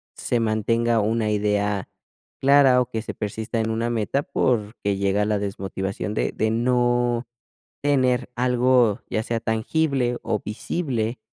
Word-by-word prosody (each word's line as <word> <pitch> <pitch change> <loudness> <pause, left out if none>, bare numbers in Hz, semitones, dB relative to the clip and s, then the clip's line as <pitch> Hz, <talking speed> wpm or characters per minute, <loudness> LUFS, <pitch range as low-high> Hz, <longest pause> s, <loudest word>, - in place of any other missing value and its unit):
se 120 - -1
mantenga 115 +1 +1
una 110 +1 0
idea 105 -1 0 0.5
clara, 135 -2 +6
o, 125 - -3
que 110 - -2
se 110 - -6
persista 110 +2 -3
en 110 - -1
una 115 +1 -1
meta 120 +4 0
porque 105 -6 -1
llega 100 +1 +1
la 105 -1 0
desmotivación 100 0 -4
de - - -1
de 110 0 0
no 120 0 +1 0.5
tener 130 -3 +1
algo, 125 -3 +3
ya 110 - -1
sea 115 0 -2
tangible, 125 +3 0
o, 105 - -1
visible 115 - -3
115 Hz, 140 wpm, -23 LUFS, 105-125 Hz, 0.5 s, clara